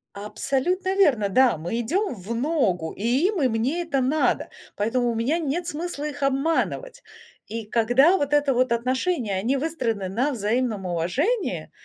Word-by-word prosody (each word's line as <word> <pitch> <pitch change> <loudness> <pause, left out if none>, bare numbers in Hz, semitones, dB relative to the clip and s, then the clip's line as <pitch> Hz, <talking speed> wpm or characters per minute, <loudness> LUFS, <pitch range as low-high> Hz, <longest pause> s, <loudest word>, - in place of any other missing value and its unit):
Абсолютно 275 - -1
верно, 260 - +3
да! 245 0 +4
Мы 175 +9 -3
идем 355 - -1
в 205 +2 -6
ногу, 230 - 0
и 245 - +1
им 395 -8 -1
и 260 - +4
мне 245 +10 -1
это 305 -6 -1
надо. 275 +5 +1 0.3
Поэтому 240 +4 0
у - - -2
меня 245 +9 0
нет 335 +2 -2
смысла 320 -2 -4
их 285 -1 -5
обманывать. 325 - -1 0.4
И 225 0 -5
когда 245 - +4
вот 285 0 0
это 290 -1 +3
вот 255 -1 +2
отношения 245 - -1 0.2
выстроены 230 - -2
на 250 +10 0
взаимном 225 -2 -1
уважении, 255 - -1
260 Hz, 150 wpm, -24 LUFS, 225-315 Hz, 0.4 s, да